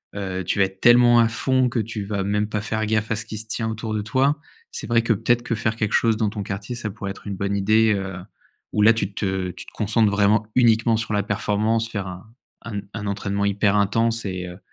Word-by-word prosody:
heu, 95 -2 -3
tu 100 - -1
vas 95 - +5
être 95 0 -9
tellement 120 +1 +6
à 115 - +5
fond 130 +2 +1
que 120 - -1
tu 110 -1 -3
vas 100 -1 -2
même 105 +1 0
pas 105 -1 -3
faire 110 +1 -2
gaffe 110 0 0
à - - +2
ce 110 +3 -5
qui 110 -1 -7
se 110 +1 -4
tient 110 +1 -2
autour 110 0 -4
de 105 - -1
toi. 135 +7 +1 0.3
C'est - - -6
vrai 115 -1 +3
que 115 0 +2
peut-être 120 +3 +1
que 115 - -2
faire 110 +1 -1
quelque 105 -2 -2
chose 115 -2 +3
dans 110 -2 +1
ton 105 -1 -5
quartier, 100 +4 -5
ça 115 -3 -4
pourrait 100 -1 -6
être 100 - -11
une 100 - -3
bonne 100 +1 -2
idée, 110 +2 +3
heu, 95 -1 -4 0.6
où 105 - +1
là 115 +1 +7
tu 105 -3 -3
te 95 -2 -2
tu - - -10
te - - -14
concentres 110 0 +2
vraiment, 105 +1 +3
uniquement 115 -2 +4
sur 110 -1 -3
la 105 -1 +1
performance, 110 +2 0
faire 100 -4 -4
un 90 +3 -9 0.3
un 110 -3 -5
un 105 -2 -5
entraînement 100 0 -2
hyper 100 0 +2
intense 115 +3 +1
et 90 -2 -4
heu, 90 +1 -9
105 Hz, 250 wpm, -23 LUFS, 100-115 Hz, 0.6 s, là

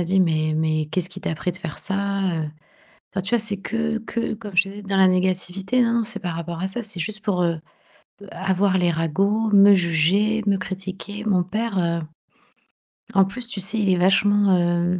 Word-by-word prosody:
m'a - - 0
dit: 190 +3 +2
«Mais 155 -3 +1
mais 155 -1 0
qu'est-ce 170 +3 -2
qui 185 +1 -10
t'as 160 - -2
pris 180 - -2
de - - -9
faire 165 -5 -6
ça?» 200 0 -1
heu, 160 -1 -2 0.7
enfin, 190 - -1
tu 200 - -4
vois, 240 -1 +2
c'est 210 -1 -1
que 225 +3 -2
que 230 +1 -3
comme 210 -3 -9
je 180 - +7
te 195 - -10
disais: 205 +1 -9
«Dans 195 -1 -1
la 190 -1 +6
négativité» 185 +5 0
non, 230 -1 +2
non, 235 -1 +2
c'est 215 -2 -7
par 175 -3 -4
rapport 170 0 -5
à 190 - 0
ça. 235 +5 -5
C'est 205 -5 -5
juste 210 +4 +1
pour, 185 -3 0
heu, 170 -2 0 0.7
avoir 190 0 +1
les 175 -1 +2
ragots, 195 +7 0
me 200 0 +8
juger, 185 +5 +2
me 200 -1 +3
critiquer. 190 +2 -6
Mon 185 -4 +3
père, 215 +2 -2
heu, 170 -1 0 1.2
en 195 -1 +6
plus, 235 +5 -5
tu 210 -4 -5
sais, 195 +4 -1
il 200 -2 +1
est 185 - +4
vachement 195 +2 +4
hem, 175 +1 +1
190 Hz, 215 wpm, -22 LUFS, 175-205 Hz, 1.2 s, me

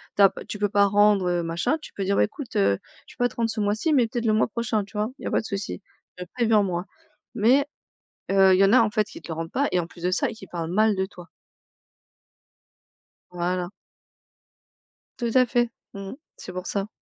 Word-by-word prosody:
ta 200 -1 +6 0.2
tu 210 - -6
peux 205 0 +1
pas 200 0 +4
rendre, 205 -1 +4
heu, 175 -1 0
machin, 170 - 0
tu - - -11
peux 200 - -3
dire: 200 +1 +1
«Beh, - - +5
écoute, 255 +4 -9
heu, 100 0 +3 0.3
je - - -15
peux - - -1
pas - - +2
te - - -17
rendre 230 -1 0
ce 225 - -4
mois-ci, 215 +10 +1
mais 250 -5 +4
peut-être 235 +1 -3
le 220 - +3
mois 215 - +3
prochain», 225 -2 -1
tu 205 - -20
vois, 210 +1 0
«Il - - -12
y - - -3
a - - -3
pas - - +2
de - - -13
soucis 200 -1 -4 0.4
mais 180 - -6
préviens 225 -3 +3
moi!» 180 -2 -2 0.5
mais 255 +7 +4 0.7
heu, 195 -1 +6
il - - +3
y - - +7
en 195 - +4
a, 255 - +7
en 225 -2 +2
fait, 215 0 -1
ils - - -10
te - - -12
le 165 - -3
rendent 165 0 -4
pas 280 +2 +1
et 180 - +3
en 165 - -4
plus 170 0 -15
de 180 - +2
ça 185 - +1
et - - -8
qui 205 -3 -12
parlent 170 -2 -5
mal 215 +2 +3
de 190 0 0
toi! 180 -3 -13 2.0
Voilà! 180 +1 -2 1.5
Tout 235 -1 -1
à 255 -1 +6
fait! 240 0 +1 0.3
Mmh 195 -1 -7
mh, - - -7 0.2
c'est 185 - -9
pour 185 0 -6
ça. 200 0 -2
205 Hz, 245 wpm, -25 LUFS, 185-225 Hz, 2.0 s, y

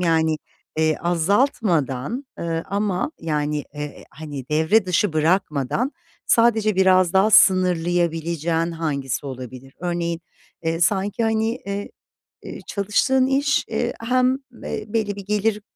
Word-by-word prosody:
Yani, 160 -2 +2 0.4
eee, 155 -1 +2
azaltmadan, 175 - 0
ııı, 165 -1 -2
ama 200 +5 -1
yani, 150 -2 -1
eee, 150 0 -7
hani, 145 -5 -8
devre 160 +8 +3
dışı 180 0 +1
bırakmadan 160 - 0 0.3
sadece 225 -3 +3
biraz 185 -1 +4
daha 195 +3 +4
sınırlayabileceğin 170 -3 +3
hangisi 145 -5 -3
olabilir? 130 0 -8
Örneğin, 170 -1 -2 0.4
eee, 165 +1 -1
sanki, 200 +5 +1
hani, 220 0 +1 0.2
eee, 200 0 -4 0.6
ııı, - - -7
çalıştığın 215 +6 +1
iş, 275 +1 +1
eee, 240 0 -1
hem, 255 +2 +2 0.3
eee, 215 - -4
belli 210 -2 -1
bir 200 - -8
gelir 210 0 0
175 Hz, 120 wpm, -22 LUFS, 160-210 Hz, 0.6 s, biraz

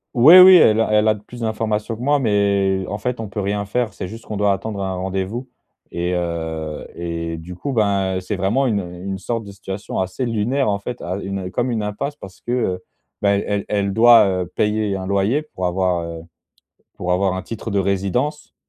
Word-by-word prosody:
Ouais, 150 +10 +9
oui, 185 0 +10
elle 110 -10 +6
a 110 -1 +1
elle 105 +1 +4
a - - +4
d 105 - -9
plus 120 0 -10
d'informations 110 0 -1
que - - -10
moi, 145 +3 +2
mais 100 -4 +1
en 100 - -3
fait, 125 +3 -3
on 110 - -4
peut 105 +1 -4
rien 100 +1 -1
faire. 115 +2 -1
C'est 95 - -6
juste 115 +4 -10
qu'on 105 - -5
doit 100 -1 +3
attendre 100 +1 -4
un 95 -1 -2
rendez-vous 95 +7 -3 0.4
et 90 +1 -2
heu, 80 -3 -4
et 85 -1 -4
du 80 +3 -8
coup, 135 +11 -4
ben, 100 -4 +1
c'est 95 +2 -4
vraiment 105 +9 +1
une 110 -5 +1
une 90 +1 -6
sorte 115 +4 -3
de 100 - -10
situation 100 0 -6
assez 95 +7 -2
lunaire, 120 +3 0
en 100 -1 0
fait 120 +4 -6
à 90 +2 -3
une 95 -2 -5
comme 120 +4 -1
une 115 -3 -1
impasse 105 +8 -3
parce 95 -10 -12
que, - - -6
heu, 95 -7 -1 0.4
ben, 100 0 +2
elle 100 -1 -2
elle 100 -1 0
doit, 115 +1 +7 0.2
heu, - - -7
payer 105 -1 0
un 95 -1 -4
loyer 100 +8 +1
pour 120 -12 -6
avoir, 90 -1 0
heu, 85 -1 -7 0.7
pour 90 0 -2
avoir 95 +1 +1
un 95 - -4
titre 115 +1 -6
de 100 - 0
résidence. 100 +10 -1
100 Hz, 215 wpm, -20 LUFS, 95-115 Hz, 0.7 s, oui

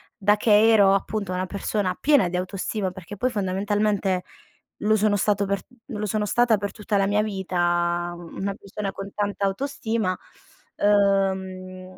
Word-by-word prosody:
da 205 -1 +3
che 215 +1 +5
ero 200 -3 +6
appunto 195 -1 -1
una 185 0 -2
persona 200 -1 -2
piena 280 -11 +4
di 180 - -2
autostima, 185 +1 -3
perché 190 +2 -10
poi 255 +5 0
fondamentalmente 200 -1 0 0.6
lo 215 +1 +2
sono 210 -1 +2
stato 205 0 +1
per 200 0 -1 0.3
lo 210 0 -4
sono 210 +1 -1
stata 240 -1 +3
per 200 +1 -4
tutta 210 -1 -3
la 195 0 +2
mia 210 +1 +2
vita 175 -3 0
una 180 +3 -5
persona 200 0 -5
con 195 0 -7
tanta 205 -1 -1
autostima, 220 -3 -1 0.6
ehm, 190 -2 0
200 Hz, 150 wpm, -24 LUFS, 185-210 Hz, 0.6 s, ero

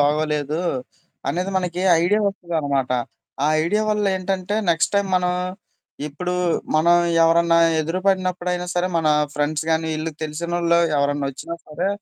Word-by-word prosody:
బాగోలేదు? 150 +1 0 0.7
అనేది 180 +7 -1
మనకి 180 -1 -2 0.2
ఐడియా 205 +5 +2
వస్తదనమాట. 155 -9 -1 0.5
ఆ - - +3 0.2
ఐడియా 210 +6 +1
వల్ల 210 0 0
ఏంటంటే 185 +1 -2 0.2
నెక్స్ట్ 165 -1 +1
టైమ్ 200 -1 +2
మనం 180 0 +1 0.8
ఇప్పుడు 180 +5 -4 0.4
మనం 165 +3 +5 0.3
ఎవరన్నా 165 0 +4 0.2
ఎదురుపడినప్పుడైనా 180 +1 -1
సరే 175 +1 +1
మన 160 -1 +1 0.2
ఫ్రెండ్స్ 150 +1 -1
గానీ, 160 0 +1
వీళ్ళు 155 +1 -3
తెలిసినోళ్ళు 170 +2 0 0.2
ఎవరన్నా 140 0 0
ఓచ్చినా 140 +5 -7
సరే, 165 +5 -2
170 Hz, 125 wpm, -22 LUFS, 155-180 Hz, 0.8 s, మనం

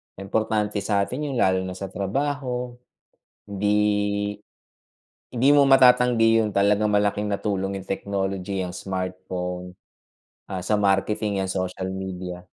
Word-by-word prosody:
Importante 105 +1 -1
sa'tin 110 +9 -1
yun - - -4
lalo 95 -4 +3
na 90 - -6
sa 95 0 -6
trabaho. 125 +3 -2 0.7
Hindi 105 0 0 0.9
hindi 130 +3 +2
mo 140 -1 +5
matatanggi 125 -3 +5
yun, 105 - 0
talagang 105 +2 +3
malaking 105 0 +1
natulong 100 -1 -2
yung 95 - -7
technology, 95 -1 -2
yang 90 - -5
smartphone, 90 -1 -5 0.7
ah, 95 -1 -4
sa 105 +3 +1
marketing, 100 0 +1
yan 95 - -3
social 95 0 -3
media. 90 -2 -6
100 Hz, 120 wpm, -24 LUFS, 95-110 Hz, 0.9 s, mo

